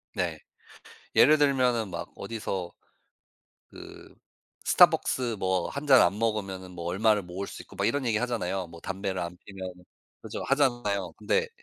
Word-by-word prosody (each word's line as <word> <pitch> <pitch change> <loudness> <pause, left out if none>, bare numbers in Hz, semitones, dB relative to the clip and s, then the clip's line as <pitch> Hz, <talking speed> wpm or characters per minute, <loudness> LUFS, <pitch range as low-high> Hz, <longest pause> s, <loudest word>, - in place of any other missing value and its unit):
네 - - -1 0.8
예를 155 +3 +7
들면은 125 -6 +2
막 - - -6
어디서 95 -6 -4 1.0
그 - - -12 0.5
스타벅스 120 -3 +4
뭐 95 -1 0
1 140 +2 -5
잔 135 -3 +8
안 95 +4 +2
먹으면은 100 -5 -2
뭐 85 -1 -7
얼마를 105 +4 +2
모을 90 +2 -6
수 - - -8
있고 - - -16
막 - - +1
이런 145 -1 0
얘기 115 -3 +1
하잖아요. 95 -6 -2
뭐 85 0 -13
담배를 95 0 -3
안 85 0 -5
피우면 95 -2 -7 0.5
그죠 - - -6
하잖아요. 120 -9 +1
근데 470 0 0
100 Hz, 290 characters per minute, -28 LUFS, 95-125 Hz, 1.0 s, 잔